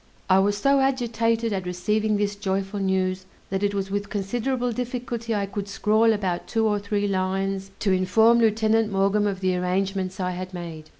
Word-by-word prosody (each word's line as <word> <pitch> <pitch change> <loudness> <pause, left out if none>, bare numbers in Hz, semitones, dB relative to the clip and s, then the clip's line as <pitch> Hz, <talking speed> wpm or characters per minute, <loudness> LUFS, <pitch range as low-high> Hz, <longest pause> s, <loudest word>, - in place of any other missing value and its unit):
I 190 - +6
was 205 +1 +2
so 275 +6 +3
agitated 230 -4 +1
at 190 -2 -3
receiving 210 +4 0
this 205 0 -1
joyful 195 0 -2
news, 190 -1 -1 0.2
that 195 0 -1
it 205 0 0
was 195 -1 -2
with 205 0 -2
considerable 240 +5 -1
difficulty 235 -1 -3
I 200 -1 0
could 200 0 -5
scrawl 215 +3 +3
about 190 -5 -2
two 225 -1 0
or 210 -1 +1
three 205 0 -1
lines 195 0 -1
to 200 - +2
inform 220 +6 +4
Lieutenant 220 -1 +2
Maughn 200 +2 +2
of 195 -2 -3
the 185 -1 +1
arrangements 185 +1 -1
I 180 -1 -1
had 185 +1 -6
made. 165 -3 -8
200 Hz, 180 wpm, -24 LUFS, 190-220 Hz, 0.2 s, I